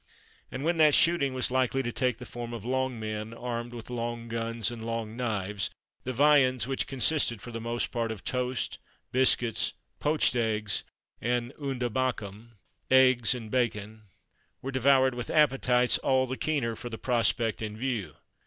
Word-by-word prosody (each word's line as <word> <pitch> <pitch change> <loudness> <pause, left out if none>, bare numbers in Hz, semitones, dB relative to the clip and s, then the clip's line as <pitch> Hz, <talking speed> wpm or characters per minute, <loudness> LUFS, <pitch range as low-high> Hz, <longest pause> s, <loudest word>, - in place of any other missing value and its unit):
And 130 - -5
when 170 +2 +1
that 155 -2 +6
shooting 155 -5 +3
was 125 -1 0
likely 130 +1 +1
to 120 - -2
take 125 0 0
the - - -9
form 120 -1 -7
of 115 -2 -7
long 130 -1 -1
men, 110 +1 -5
armed 120 0 -4
with 120 0 -9
long 120 -1 -4
guns, 115 0 -1
and 115 -2 -7
long 115 -1 -4
knives, 105 -5 -2 0.4
the 130 - -1
viands, 130 -2 +4
which 135 +1 -2
consisted 135 -3 +1
for 120 - -9
the 115 -1 -5
most 120 +1 -2
part 115 -1 -1
of 110 -4 -7
toast, 125 0 -2 0.3
biscuits, 120 -3 +2 0.3
poached 150 -3 +2
eggs, 110 -3 0 0.4
and 120 +2 -1
unda 130 -3 -1
bakum 115 -3 -3 0.4
(eggs 130 -2 +5
and 110 -3 -7
bacon), 110 -3 -1 0.6
were 135 - -3
devoured 130 0 +4
with 120 0 -5
appetites 130 -5 +3
all 130 -1 +2
the 130 0 -4
keener 135 -6 -1
for 120 - -7
the 110 - -6
prospect 115 -3 +1
in 105 -1 -4
view. 110 - -3
120 Hz, 165 wpm, -28 LUFS, 115-130 Hz, 0.6 s, that